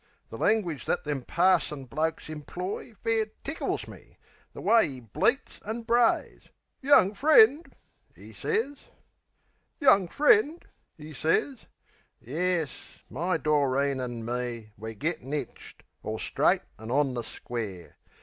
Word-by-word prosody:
The - - -7
langwidge 190 -9 +1
that - - -1
them 145 -3 -3
parson 170 -2 +1
blokes 155 +5 -2
imploy 180 - -6
Fair 225 -1 +1 0.2
tickles 320 - -3
me. - - -14 0.3
The - - -10
way'e 155 - +3
bleats 125 - -1
an' 225 +3 -4
brays! 235 0 +1 0.3
"Young 265 -8 +5
friend," 315 - +5 0.5
'e - - -13
sez. 435 -11 -1 1.0
"Young 200 - +5
friend," 320 - +3 0.3
'e 155 0 -10
sez...Yes, 165 - -3
my 170 +5 0
Doreen 140 -2 +1
an' 120 -2 -5
me 120 -2 -4
We're 110 +2 -8
gettin' 150 +2 -3
hitched, 150 - -6 0.2
all 110 +1 -4
straight - - +1 0.2
an' 110 +1 -8
on 135 +1 +1
the 120 -1 -3
square. 105 -9 -7
155 Hz, 120 wpm, -27 LUFS, -, 1.0 s, Young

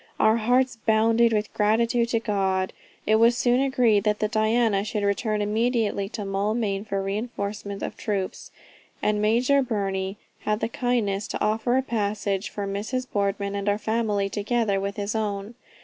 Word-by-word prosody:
Our 220 +1 +4
hearts 245 +2 +2
bounded 225 +1 +3
with 210 -1 -1
gratitude 230 +3 +2
to 230 - +1
God. 190 -4 0 0.3
It 215 +1 +4
was 235 +2 +4
soon 245 0 +3
agreed 245 -6 +3
that 210 -1 +1
the 215 - 0
Diana 220 -1 +2
should 210 0 -3
return 210 +1 0
immediately 215 -2 0
to 210 -2 -5
Maulmain 200 +1 -1
for 200 -2 -2
a - - 0
reinforcement 200 -1 -4
of - - -4
troops, 200 -3 -3 0.5
and 210 0 +1
Major 245 +6 +3
Burney 195 -5 -2 0.2
had 210 0 -1
the - - -1
kindness 225 -5 -1
to - - -4
offer 225 +4 +1
a 265 - +1
passage 205 -4 -1
for 205 - -4
Mrs. 210 +6 -3
Boardman 200 0 -1
and 200 0 -1
our 205 - +2
family 215 -2 0
together 205 0 0
with 200 0 -3
his 205 0 -3
own. 210 -1 -3
215 Hz, 165 wpm, -25 LUFS, 200-230 Hz, 0.5 s, Our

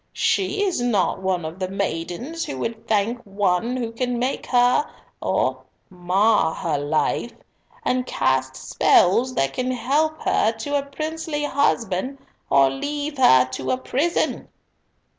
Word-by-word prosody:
"She 400 +1 +1
is 370 -10 0
not 205 -7 +1
one 185 -3 -1
of 160 +4 -7
the 185 - -1
maidens 195 - -3
who 295 - -5
would 225 -1 -5
thank 220 +3 +1
one 200 +4 0
who 235 -3 -3
can 245 +1 -2
make 255 +3 -2 0.7
or - - 0 0.3
mar 185 0 +2
her 160 -5 -1
life, 145 +1 -1 0.5
and 255 0 +1
cast 130 0 0
spells 235 - +3
that 135 0 0
can 255 0 -2
help 290 +6 0
her 220 - +2
to 290 +5 -4
a 285 - +2
princely 310 +2 -4
husband 260 -4 0 0.3
or 135 -1 +5
leave 290 - -4
her 130 - +6
to 130 0 -4
a 255 - +1
prison." 290 +6 -1
230 Hz, 140 wpm, -22 LUFS, 180-280 Hz, 0.7 s, her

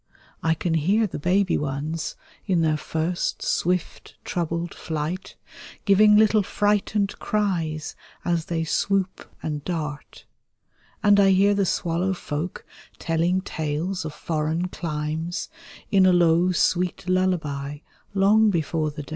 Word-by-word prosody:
I 160 0 +2
can 165 +1 -2
hear 190 +8 +2
the 185 - -5
baby 185 +4 +2
ones, 150 +3 -3 0.3
in 180 -3 +2
their 155 -1 +2
first, 160 +3 -2
swift, 180 0 -1
troubled 170 0 -2
flight. 160 +3 -4 0.5
Giving 210 +1 +6
little 215 0 +5
frightened 205 0 0
cries 170 -8 -1 0.3
as 170 -2 0
they 165 -1 -1
swoop 190 +3 -1
and 150 -2 -3
dart. 150 -5 -5 0.8
And 205 0 +6
I 195 -1 +6
hear 195 +2 +4
the 200 -2 +1
swallow 175 +3 0
folk 160 +1 -5 0.3
telling 170 +3 0
tales 160 +3 -3
of 155 - -4
foreign 160 +3 -1
climes, 160 +1 -3 0.4
In 190 -2 +5
a 185 - +5
low 175 +1 +4
sweet 180 0 0
lullaby 160 -7 0 0.4
long 210 +3 +5
before 160 -3 0
the 150 0 -7
day. - - -14
175 Hz, 130 wpm, -24 LUFS, 155-190 Hz, 0.8 s, Giving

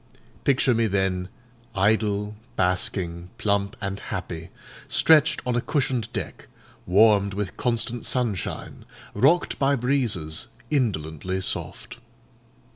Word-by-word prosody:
Picture 135 -2 +4
me 115 -1 +2
then 95 -2 0 0.5
idle, 105 +1 +1 0.2
basking, 90 -1 -1
plump, 100 -3 0
and 100 -1 -3
happy, 85 -2 -5 0.4
stretched 155 -1 +4
on 125 -1 0
a 120 - +2
cushioned 130 -6 -1
deck, - - -6 0.4
warmed 100 +1 +4
with 100 -2 -3
constant 120 0 0
sunshine, 120 -7 -2 0.3
rocked 165 +7 +3
by 140 0 +3
breezes 115 - -1 0.2
indolently 95 - -1
soft. 95 - -4
105 Hz, 105 wpm, -25 LUFS, 95-125 Hz, 0.5 s, Picture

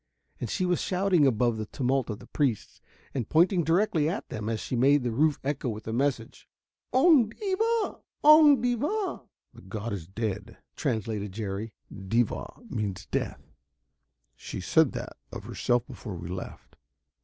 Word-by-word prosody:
And 120 - -4
she 185 - 0
was 180 -1 +1
shouting 180 -5 +3
above 120 -2 +2
the 110 -1 -4
tumult 130 0 0
of 105 - -3
the - - -13
priests 130 -8 -2 0.3
and 125 -6 -3
pointing 175 +2 +4
directly 165 -2 +2
at 185 - -4
them 110 -2 -4
as 110 -1 -1
she 125 - -4
made 135 +3 +4
the 120 - -1
roof 150 +5 +2
echo 135 -2 -1
with 110 -1 -5
the 110 - -4
message: 125 -2 -2 0.4
"Oong 260 -4 +5
devah! 440 +3 0 0.2
Oong 300 -2 +8
devah!" 295 - -1 0.3
"The - - -14
god 110 0 -5
is 85 -5 -6
dead," 100 0 -4 0.2
translated 105 -3 -2
Jerry. 105 +1 -4 0.2
"Devah 110 - -2
means 105 -5 -3
death; - - -2 0.9
she - - -7
said - - +3
that - - -6
of - - -7
herself 120 0 0
before 105 -6 -8
we 85 0 -7
left. 95 +1 -8
125 Hz, 155 wpm, -28 LUFS, 110-180 Hz, 0.9 s, Oong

